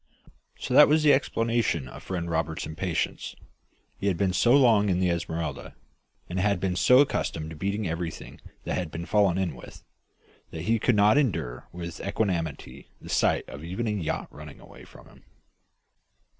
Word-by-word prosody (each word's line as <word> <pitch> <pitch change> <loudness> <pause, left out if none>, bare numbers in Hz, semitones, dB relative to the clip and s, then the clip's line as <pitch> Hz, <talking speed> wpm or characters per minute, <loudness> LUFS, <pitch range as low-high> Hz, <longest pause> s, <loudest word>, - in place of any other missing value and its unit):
So 125 - -4
that 150 +3 +8
was 155 +1 +3
the 150 - +6
explanation 115 - 0
of - - -11
friend 90 -2 -4
Roberts's 80 -1 -2
impatience! 80 +2 -3 0.6
He 100 - -2
had 95 -4 +1
been 95 -1 +1
so 120 +6 +3
long 115 -7 +4
in 90 -1 +1
the 90 -1 +2
Esmeralda, 85 -1 -4 0.5
and 90 +2 -3
had 100 -1 +1
been 90 -1 -1
so 125 +9 +6
accustomed 80 - -2
to - - -8
beating 100 +4 -2
everything 85 0 -6 0.2
that - - -3
had 90 -3 -4
been 80 +2 -6
fallen 100 -3 +2
in 95 -4 -1
with, - - -13 0.7
that 80 -1 -7
he 115 +4 +1
could 120 - +2
not 105 +6 +5
endure 75 - -2
with 85 -1 -7
equanimity 85 - -3
the - - -12
sight - - +1
of 75 - -9
even 95 +8 -4
a 110 - 0
yacht 95 -7 -3
running - - -11
away - - -14
from - - -16
him. - - -20
95 Hz, 175 wpm, -26 LUFS, 85-105 Hz, 0.7 s, that